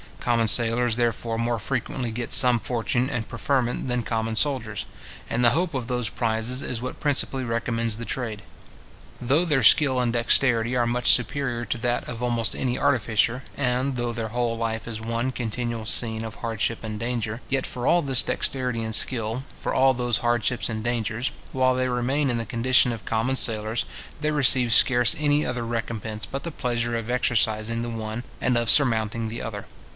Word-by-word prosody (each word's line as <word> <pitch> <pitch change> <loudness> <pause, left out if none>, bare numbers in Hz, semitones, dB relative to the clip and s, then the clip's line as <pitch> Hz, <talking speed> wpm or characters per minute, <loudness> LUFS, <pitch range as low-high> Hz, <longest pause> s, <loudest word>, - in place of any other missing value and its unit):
Common 115 -2 +1
sailors, 115 +2 +4
therefore, 115 -1 -1
more 115 +1 -1
frequently 125 +1 -3
get 120 +1 -5
some 125 -2 +7
fortune 120 +2 -1
and 120 -6 -4
preferment 125 +1 -1
than 125 -1 -1
common 110 0 -2
soldiers; 120 -4 0 0.4
and 120 - -1
the 120 - +6
hope 165 +4 -1
of 125 -3 -3
those 125 -4 -1
prizes 115 +3 -1
is 120 -2 -4
what 130 - -6
principally 135 -2 0
recommends 115 -1 -1
the 115 - -6
trade. 115 -5 -4 0.8
Though 140 +8 +1
their 145 -6 +1
skill 130 +2 +5
and 120 -2 0
dexterity 120 0 +3
are 120 -1 +2
much 120 +1 +4
superior 125 0 +1
to - - -2
that 120 +1 -2
of 120 -1 -7
almost 120 -2 0
any 125 -1 -2
artificers; 120 -2 +1 0.2
and 130 0 0
though 120 -1 -3
their 115 -1 -4
whole 120 0 -2
life 115 -1 -3
is 110 -1 -6
one 115 +3 -2
continual 120 -1 -4
scene 110 +1 +2
of 110 -1 -7
hardship 115 0 -3
and 110 -1 -5
danger; 115 0 -3
yet 135 -1 0
for 125 -1 -6
all 175 - +4
this 135 -2 +3
dexterity 125 -4 -2
and 110 -1 0
skill, 115 0 +1
for - - -4
all 135 0 +4
those 120 -1 -1
hardships 120 0 0
and 110 -1 -4
dangers, 115 0 -2 0.2
while 130 -1 +2
they 130 0 -1
remain 130 +4 0
in 120 - -1
the 115 - -3
condition 125 +1 +2
of 115 -3 -7
common 115 +4 -1
sailors, 110 -3 0 0.3
they 155 0 -1
receive 130 -5 +4
scarce 120 -1 +5
any 150 0 +1
other 125 -1 -3
recompence 115 -2 -4
but 135 - -6
the 170 - -5
pleasure 120 -4 -2
of 115 0 -4
exercising 115 -2 +1
the 120 - -4
one 110 +1 -5 0.2
and 125 - 0
of 120 -1 +1
surmounting 115 -4 +3
the 115 +1 -6
other. 105 -3 -6
120 Hz, 185 wpm, -24 LUFS, 115-125 Hz, 0.8 s, some